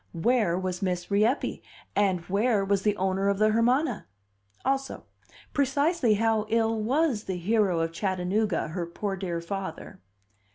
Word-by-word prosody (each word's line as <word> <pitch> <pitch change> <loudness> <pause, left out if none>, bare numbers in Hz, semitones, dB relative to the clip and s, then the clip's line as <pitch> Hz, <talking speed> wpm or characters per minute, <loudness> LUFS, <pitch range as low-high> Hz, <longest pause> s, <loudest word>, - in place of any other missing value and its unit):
Where 210 -1 +2
was 185 0 -3
Miss 180 -1 -2
Rieppe, 215 +7 +1 0.3
and 190 -4 +2
where 200 +3 +1
was 200 0 +1
the 210 +1 +1
owner 190 +1 +1
of 200 - +1
the 215 +1 +4
Hermana? 245 +3 +1 0.6
Also, 270 0 -1 0.5
precisely 280 -2 +2
how 220 0 +1
ill 225 -1 +1
was 260 -1 +1
the 190 -2 -3
hero 190 -2 +1
of 165 0 -1
Chattanooga, 185 +1 -1
her 170 +1 -4
poor 195 +3 -3
dear 175 -3 -3
father? 190 -1 -6
205 Hz, 140 wpm, -27 LUFS, 185-230 Hz, 0.6 s, the